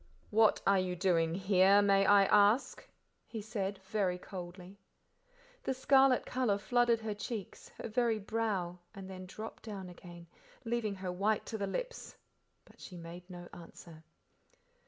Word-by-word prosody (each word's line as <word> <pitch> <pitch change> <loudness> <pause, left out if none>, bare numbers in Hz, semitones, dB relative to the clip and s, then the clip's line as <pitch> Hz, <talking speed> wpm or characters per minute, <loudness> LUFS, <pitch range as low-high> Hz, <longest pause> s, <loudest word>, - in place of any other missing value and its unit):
"What 220 0 +4
are 195 -1 +4
you 185 -1 -2
doing 170 -3 +1
here, 195 +1 +5
may 195 -1 +4
I 200 -1 +6
ask?" 210 +5 +3 0.4
he 225 - -6
said, 205 -2 -3
very 190 -3 -1
coldly. 180 +1 -9 0.8
The 265 - -2
scarlet 265 0 +4
colour 250 -6 0
flooded 240 +2 +2
her 220 -1 -3
cheeks, 205 0 -7
her - - -5
very 230 0 +1
brow, 200 -5 -2 0.2
and 195 -1 -8
then 185 -1 -8
dropped 215 +4 -8
down 195 -4 -7
again, 175 -1 -12 0.4
leaving 225 -3 -1
her 185 -1 -4
white 200 +4 0
to 220 - -5
the 200 - -1
lips, - - -5 0.5
but - - -21
she 180 - -9
made 175 +2 -10
no 175 -1 -9
answer. 165 -1 -12
200 Hz, 150 wpm, -33 LUFS, 180-220 Hz, 0.8 s, I